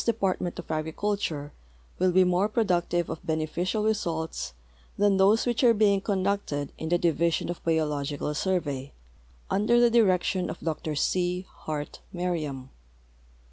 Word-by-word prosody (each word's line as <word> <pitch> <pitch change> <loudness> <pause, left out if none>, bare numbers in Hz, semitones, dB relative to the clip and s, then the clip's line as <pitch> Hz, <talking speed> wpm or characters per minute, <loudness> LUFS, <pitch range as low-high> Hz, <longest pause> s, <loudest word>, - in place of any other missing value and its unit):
DeiDartment 195 -6 0
of - - -7
Agriculture 160 -1 -2 0.5
Avill 185 0 +3
be 185 +1 +5
more 180 +3 +2
productive 175 -6 +1
of - - -6
beneficial 165 +6 -1
results 165 - -2 0.4
than 205 -1 +3
those 200 +4 +4
which 245 +1 0
are 235 -2 +6
being 200 -2 +3
conducted 190 -8 -1
in 160 - -3
the 175 - +3
Division 170 0 +1
of 175 - -8
Biological 150 -3 -1
Surve}^, 150 -5 -2 0.6
under 220 +4 +3
the 240 -1 +5
direction 185 -5 +2
of - - -6
Dr 155 -1 -3
C. 180 +4 0
Hart 150 -1 -5
Merriam. 155 -7 -3
175 Hz, 135 wpm, -27 LUFS, 155-200 Hz, 0.6 s, are